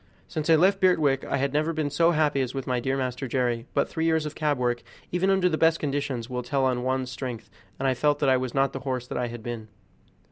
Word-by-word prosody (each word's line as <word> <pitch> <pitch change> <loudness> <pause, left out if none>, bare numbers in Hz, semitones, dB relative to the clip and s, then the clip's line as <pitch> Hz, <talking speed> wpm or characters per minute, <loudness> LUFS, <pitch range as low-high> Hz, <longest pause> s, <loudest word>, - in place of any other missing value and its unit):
Since 155 +1 -3
I 165 - +8
left 190 +5 +3
Birtwick 155 -8 +3
I - - -1
had 140 0 -1
never 155 +3 +1
been 155 -2 -1
so 165 +4 +3
happy 150 -4 +2
as 130 0 -3
with 135 -1 -3
my 125 -1 0
dear 135 +2 -1
master 130 0 -3
Jerry; 120 -2 -1
but - - +2
three 160 0 -2
years 160 -1 +2
of 150 - -4
cab 150 -2 0
work, 120 -1 0 0.3
even 180 +2 +1
under 190 -2 +3
the 155 -3 0
best 165 0 +4
conditions, 140 -5 -2
will 125 -1 -3
tell 135 +2 0
on 125 -1 +1
one's 130 0 -1
strength, 115 -4 -6 0.3
and 135 - -1
I 130 - +3
felt 145 +3 +2
that 145 - 0
I 130 - +5
was 130 0 -4
not 135 0 +2
the 135 - -4
horse 130 -2 -3
that - - -5
I 125 - 0
had 120 -1 -8
been. 115 -2 -5
135 Hz, 260 wpm, -26 LUFS, 125-155 Hz, 0.3 s, I